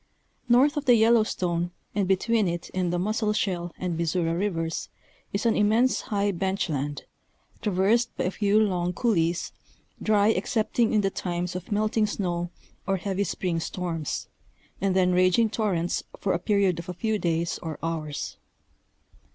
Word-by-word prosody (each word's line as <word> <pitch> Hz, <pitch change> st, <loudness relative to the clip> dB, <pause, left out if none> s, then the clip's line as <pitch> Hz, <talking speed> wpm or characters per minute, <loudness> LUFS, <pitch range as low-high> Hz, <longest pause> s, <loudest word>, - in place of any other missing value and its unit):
North 275 Hz, +6 st, +5 dB
of 295 Hz, -, -2 dB
the 245 Hz, -, +6 dB
Yellowstone 215 Hz, -7 st, +2 dB, 0.2 s
and 200 Hz, -2 st, 0 dB
between 210 Hz, +2 st, +2 dB
it 170 Hz, 0 st, -4 dB
and 180 Hz, -2 st, 0 dB
the 175 Hz, -, 0 dB
Musselshell 205 Hz, -3 st, 0 dB
and 180 Hz, -2 st, -2 dB
Missouri 165 Hz, 0 st, 0 dB
Rivers 165 Hz, -3 st, -2 dB, 0.4 s
is 200 Hz, +3 st, -2 dB
an 230 Hz, -, +3 dB
immense 225 Hz, +5 st, +3 dB
high 205 Hz, -1 st, 0 dB
bench 190 Hz, +1 st, -1 dB
land, 145 Hz, -1 st, -3 dB, 0.6 s
traversed 210 Hz, +4 st, +1 dB
by -, -, 0 dB
a 180 Hz, -, 0 dB
few 205 Hz, +1 st, +2 dB
long 180 Hz, -4 st, +1 dB
couleés, 170 Hz, -6 st, +1 dB, 0.5 s
dry 210 Hz, 0 st, +4 dB
excepting 225 Hz, 0 st, +1 dB
in 215 Hz, -, +3 dB
the 195 Hz, -1 st, 0 dB
times 175 Hz, -1 st, -3 dB
of 180 Hz, -, -6 dB
melting 215 Hz, +1 st, +2 dB
snow 175 Hz, -4 st, -2 dB, 0.4 s
or 195 Hz, 0 st, +2 dB
heavy 195 Hz, +1 st, -1 dB
spring 180 Hz, -4 st, -2 dB
storms, 165 Hz, -3 st, -3 dB, 0.5 s
and 195 Hz, -1 st, +1 dB
then 180 Hz, -1 st, +4 dB
raging 185 Hz, +5 st, +3 dB
torrents 185 Hz, -7 st, 0 dB, 0.2 s
for 195 Hz, -, 0 dB
a 170 Hz, -, 0 dB
period 195 Hz, -3 st, +2 dB
of 170 Hz, +2 st, -8 dB
a 180 Hz, -, -4 dB
few 220 Hz, +2 st, -1 dB
days 170 Hz, -1 st, -1 dB
or 160 Hz, -3 st, -5 dB
hours. 155 Hz, -, -3 dB
190 Hz, 155 wpm, -26 LUFS, 175-215 Hz, 0.6 s, the